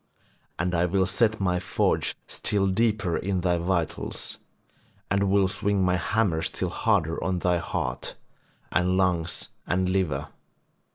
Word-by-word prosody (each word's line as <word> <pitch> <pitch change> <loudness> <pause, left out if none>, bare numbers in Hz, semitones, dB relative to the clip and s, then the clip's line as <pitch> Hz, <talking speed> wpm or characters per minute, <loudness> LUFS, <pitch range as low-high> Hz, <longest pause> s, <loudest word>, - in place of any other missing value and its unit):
And 90 +2 -1
I 85 0 +3
will 95 +1 +2
set 105 +3 +1
my 90 -2 +1
forge - - 0
still 100 -2 0
deeper 100 -3 +1
in 95 -1 -1
thy 85 -1 +1
vitals, 85 -2 -1 0.7
and 100 -1 +2
will 100 -1 +4
swing 100 0 +1
my 90 0 +2
hammer 90 -3 +1
still 90 +2 -2
harder 85 -5 +1
on 95 +1 0
thy 90 0 +2
heart - - -3 0.6
and 90 +1 +2
lungs 90 -3 0 0.2
and 90 +1 +1
liver. 95 -3 0
95 Hz, 135 wpm, -26 LUFS, 90-100 Hz, 0.7 s, will